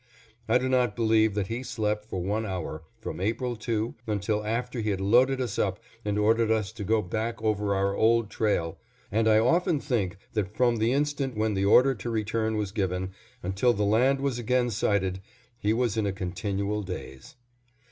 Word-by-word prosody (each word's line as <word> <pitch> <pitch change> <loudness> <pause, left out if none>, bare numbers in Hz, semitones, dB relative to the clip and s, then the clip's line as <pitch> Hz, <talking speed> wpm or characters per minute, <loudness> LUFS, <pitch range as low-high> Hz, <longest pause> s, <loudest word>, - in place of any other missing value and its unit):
I 120 - +5
do 130 +1 -1
not 125 -4 +2
believe 110 -2 +3
that 105 -2 0
he 115 +5 -4
slept 105 -4 -2
for 95 -4 -4
one 105 +4 -1
hour 90 -6 -4 0.2
from - - -6
April 120 +4 -1
2 110 0 -2
until 105 0 -1
after 120 +3 -2
he 110 - -1
had 100 -2 -1
loaded 125 +7 +4
us 120 -5 -2
up - - 0 0.2
and 105 0 -1
ordered 110 +2 +3
us 110 -3 +1
to 110 -2 -7
go 110 +2 +2
back 110 +5 -3
over 105 -2 +1
our 100 0 +1
old 115 0 +3
trail, 95 -7 0 0.3
and 110 +2 +2
I 110 -1 +6
often 165 - +3
think 105 - -1 0.2
that 105 -1 -2
from 120 -2 +3
the 110 +2 +2
instant 140 -3 -1
when 110 0 +1
the 95 0 0
order 125 +6 +6
to 120 0 -6
return 110 0 -1
was 105 -2 -2
given 95 -2 -2 0.3
until 95 +7 +2
the 105 -1 0
land 130 +6 +3
was 135 -3 -1
again 120 +1 +1
sighted, 95 -3 0 0.4
he 105 - +1
was 115 -1 +1
in 105 -2 +1
a - - 0
continual 100 +2 -2
daze. 90 -9 -8
110 Hz, 190 wpm, -27 LUFS, 100-120 Hz, 0.4 s, I